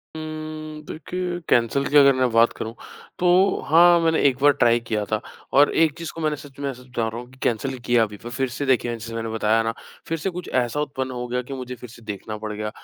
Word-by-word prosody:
उम्म, 155 -1 -6
देखिए 180 +3 -4
कैंसल 120 +4 +2
की 145 - +4
अगर 140 -1 +7
मैं 130 -1 +2
बात 115 +1 +4
करूँ 110 +1 -5 0.5
तो 180 - +2 0.4
हाँ, 170 +3 +6
मैंने 165 -1 +2
एक 130 - -5
बार 145 +1 +7
ट्राई 120 -3 +3
किया 110 -2 -2
था 110 +1 0 0.3
और 145 +2 +6
एक 160 -3 +3
चीज़ 165 -1 -5
को 165 - -7
मैंने 155 -1 +1
सच 140 -1 -13
मैं 140 -1 -2
सच 125 +1 -15
बता 115 -2 -2
रहा 115 +2 -5
हूँ 125 - -13
कि 130 - -18
कैंसल 130 +3 -1
किया 120 -2 +4
भी, 105 -1 -10
पर 120 - -9
फ़िर 125 +2 -2
से 135 +4 -4
देखिए 125 -3 +2
जैसे 115 0 -7
मैंने 115 0 -3
बताया 110 0 +2
ना 115 0 -1 0.3
फ़िर 165 - -1
से 160 - -2
कुछ 180 -1 -7
ऐसा 120 +5 -2
उत्पन्न 130 -3 -3
हो 125 0 -4
गया 125 +1 -1
कि 125 +2 -8
मुझे 125 -1 -6
फ़िर 125 0 -11
से 115 - -14
देखना 105 0 -6
पड़ 110 0 -5
गया। 105 0 -3
130 Hz, 250 wpm, -23 LUFS, 115-150 Hz, 0.5 s, अगर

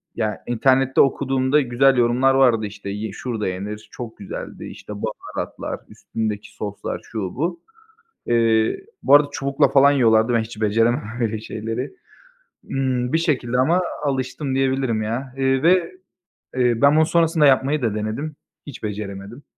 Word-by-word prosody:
ya, 110 -2 -2
internette 130 +2 +3
okuduğumda 135 +1 +2
güzel 130 +1 +3
yorumlar 125 +3 +3
vardı. 120 -5 +4
İşte 105 0 -7
ye 105 +1 -4
şurada 110 0 -4
yenir, 100 +3 -5
çok 120 -2 -8
güzeldi, 100 - -7
işte, 105 - -9
baharatlar, 105 +1 -5
üstündeki 110 -2 -5
soslar, 100 -1 -5
şu, 110 - -4 0.2
bu. 170 +5 -2 0.7
Eee, 115 - +2 0.2
bu 140 - +7
arada 145 0 +6
çubukla 140 +1 +1
falan 140 0 +5
yiyorlardı, 115 -3 +3
ben 115 - +3
hiç 110 0 -8
beceremem 115 +5 +2 0.2
öyle 110 -2 -1
şeyleri. 110 - -5 0.7
Imm, 130 -1 -1
bir - - +5
şekilde 130 -7 0
ama 165 +8 +3 0.2
alıştım 135 0 -2
diyebilirim, 130 -4 0
ya. 125 +4 -4
Eee, 135 0 +1
ve, 175 0 +3 0.7
eee, 120 -2 +2
ben 140 +1 +6
bunu 160 0 +5
sonrasında 165 -1 +3
yapmayı 140 +2 +3
da 110 -4 0
denedim, 110 +9 -4 0.3
hiç 140 - -9
beceremedim. 105 +3 -6
125 Hz, 145 wpm, -22 LUFS, 110-135 Hz, 0.7 s, bu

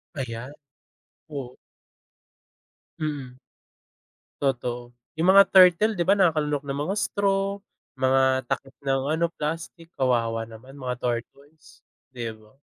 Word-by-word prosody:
Ayan, 125 0 -5 0.8
oo. 130 -3 -6 1.4
Mm. 140 -5 -4 1.0
Totoo 120 -2 -2 0.2
yung 165 +4 +1
mga 200 +1 +9
turtle, 190 +3 +6
'di 175 - -3
ba, 200 - +6
nakalunok 150 -5 +2
ng 135 - -3 0.2
mga 195 - 0
straw, 200 -1 0 0.3
mga 130 -1 +2
takip 135 -1 -3
ng 135 -1 0
ano 170 +1 +1
plastik 165 +1 -6
kawawa 115 -3 +1
naman 115 +5 -13
mga 125 -3 -4
tortoise, 125 +3 -6 0.2
'di 120 -3 -5
ba? 110 +5 -22
135 Hz, 115 wpm, -25 LUFS, 125-165 Hz, 1.4 s, mga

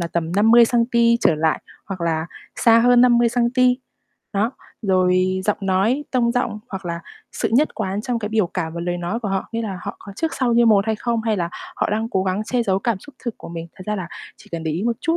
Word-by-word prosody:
là 170 - -1
tầm 165 0 -2
50 225 +4 +6
xăng-ti 235 0 +3
trở 165 - +4
lại 155 +1 +1 0.3
hoặc 190 -2 -6
là 165 -1 -1 0.3
xa 230 -1 +5
hơn 245 +1 +5
50 240 -1 +5
xăng-ti. 250 +1 +2 0.6
Đó, 210 +3 +1 0.3
rồi 185 -1 +2
giọng 210 - +1
nói, 195 +9 +1
tông 240 -2 +2
giọng, 240 -3 -1
hoặc 190 -3 -6
là 170 0 -3 0.3
sự - - -1
nhất 290 +6 +3
quán 195 +2 -2
trong 240 0 -1
cái 210 -2 -4
biểu 215 -4 +1
cảm 165 -2 -4
và 170 - -4
lời 175 +1 -2
nói 175 +7 -3
của 215 - -3
họ, 195 0 -2
nghĩa 230 0 -2
là 195 -4 -4
họ - - -6
có 200 - -11
trước 325 0 -2
sau 250 -3 +1
như 235 0 +5
một 210 -2 +4
hay 220 -1 0
không, 235 0 -1
hay 220 -1 0
là 170 -3 -1 0.3
họ - - 0
đang 220 +2 -1
cố 190 - +1
gắng 190 +3 -1
che 240 +2 0
giấu 190 -3 +1
cảm 225 0 -1
xúc 290 +8 -15
thật 240 - 0
của - - -10
mình. 165 0 -6
Thật 185 - -9
ra 210 0 -1
là 180 -3 -5 0.3
chỉ - - -18
cần 165 -1 -3
để 160 - -1
ý 170 +5 -2
một 235 0 0
chút 330 +1 +1
210 Hz, 255 wpm, -21 LUFS, 185-235 Hz, 0.6 s, 50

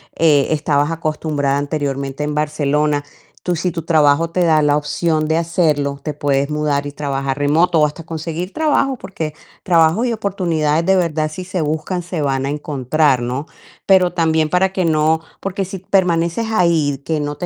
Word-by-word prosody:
eh, 150 -4 +3
estabas 145 -1 +1
acostumbrada 155 -3 -1
anteriormente 140 -1 -3
en 150 0 -2
Barcelona. 150 -1 0 0.4
Tú 180 - 0
si 175 +2 -1
tu 165 -1 -5
trabajo 155 0 +3
te 180 - 0
da 160 -2 +4
la 145 -1 +3
opción 155 +1 0
de 160 +1 +1
hacerlo, 155 -4 0
te 150 - -3
puedes 140 -1 0
mudar 150 -2 -1
y 145 - -5
trabajar 140 -2 -3
remoto 160 +4 +2
o 150 - +5
hasta 150 +3 -5
conseguir 165 +3 -5
trabajo, 290 -3 +1
porque 160 -8 -5 0.3
trabajo 170 +5 +3
y 245 - 0
oportunidades 170 -7 0
de 190 0 +3
verdad, 155 -3 0
si 180 +4 -7
se 185 -1 -3
buscan, 160 +4 -2
se 175 -2 -4
van 135 -2 0
a 140 - -2
encontrar, 145 -1 +1
¿no? 125 +4 -3 0.4
Pero 185 -2 +4
también 160 -2 +1
para 185 +2 +1
que 185 - 0
no 160 0 +2 0.2
Porque 195 0 -3
si 190 +1 -6
permaneces 180 +2 +1
ahí, 165 -8 +2
que 160 -2 -1
no 145 0 -4
te 180 - -4
155 Hz, 180 wpm, -18 LUFS, 145-175 Hz, 0.4 s, o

